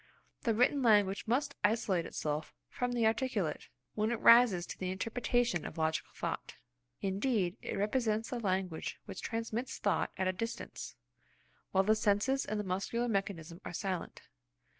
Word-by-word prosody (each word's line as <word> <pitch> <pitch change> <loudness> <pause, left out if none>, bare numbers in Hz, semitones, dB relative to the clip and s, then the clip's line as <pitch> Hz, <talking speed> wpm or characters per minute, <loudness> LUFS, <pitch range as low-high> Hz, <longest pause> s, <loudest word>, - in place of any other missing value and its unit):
The 230 -2 +1
written 250 +5 +3
language 205 -4 +3
must 280 +5 +1
isolate 205 -5 +2
itself 150 0 -3
from 245 0 -2
the 235 -2 +2
articulate, 220 - 0 0.3
when 215 +1 0
it 235 -1 -1
rises 230 -7 +7
to - - -8
the 185 - -2
interpretation 230 -1 0
of - - -7
logical 160 0 0
thought. - - -4 0.5
Indeed, 195 -2 0
it - - -4
represents 220 +2 0
the 245 - -2
language 185 -5 -2
which - - -7
transmits 230 +2 -3
thought 205 - +1
at 185 0 +1
a 185 - +1
distance, 230 +5 -5 0.8
while 190 0 +4
the 215 +2 +4
senses 220 +5 +2
and 215 - -2
the - - -1
muscular 195 +6 -1
mechanism 190 -5 -2
are - - -6
silent. 185 -1 -4
210 Hz, 155 wpm, -33 LUFS, 185-235 Hz, 0.8 s, rises